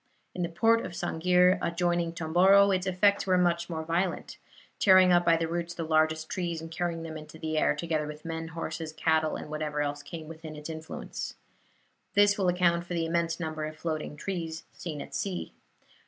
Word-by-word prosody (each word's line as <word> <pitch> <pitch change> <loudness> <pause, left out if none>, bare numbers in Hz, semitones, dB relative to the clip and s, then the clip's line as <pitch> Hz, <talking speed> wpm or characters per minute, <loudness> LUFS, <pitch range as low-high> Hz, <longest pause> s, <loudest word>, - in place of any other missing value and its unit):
In 180 - -4
the 170 - -1
port 225 +6 +3
of - - -6
Sang'ir, 180 +2 +3
adjoining 175 0 0
Tomboro, 185 +5 +5
its 185 0 0
effects 200 +2 +2
were 185 -1 +4
much 170 -1 +1
more 160 -2 -4
violent 170 +2 -2 0.4
tearing 185 -2 +7
up 175 0 +5
by 170 -1 +4
the 165 0 -1
roots 170 +1 -3
the 165 - -3
largest 155 0 +1
trees, 170 -3 -3
and 165 0 -8
carrying 165 0 -2
them 160 -1 -6
into 155 +1 -11
the 160 0 -3
air, 155 - +3
together 155 -1 -2
with 150 +1 -9
men, 165 0 -4
horses, 165 -1 -5
cattle, 160 0 +1
and - - -6
whatever 150 -1 -3
else 145 0 -1
came 155 +2 -8
within 160 -1 -9
its 150 +2 -7
influence. 160 0 -6 0.8
This 205 0 +5
will 195 -3 0
account 175 -1 +2
for 175 - -3
the 165 -1 0
immense 165 0 0
number 155 -2 -3
of 155 0 -7
floating 155 -2 -4
trees 165 -2 -4
seen 155 -4 -6
at - - -14
sea. 190 -3 -3
165 Hz, 195 wpm, -29 LUFS, 160-180 Hz, 0.8 s, tearing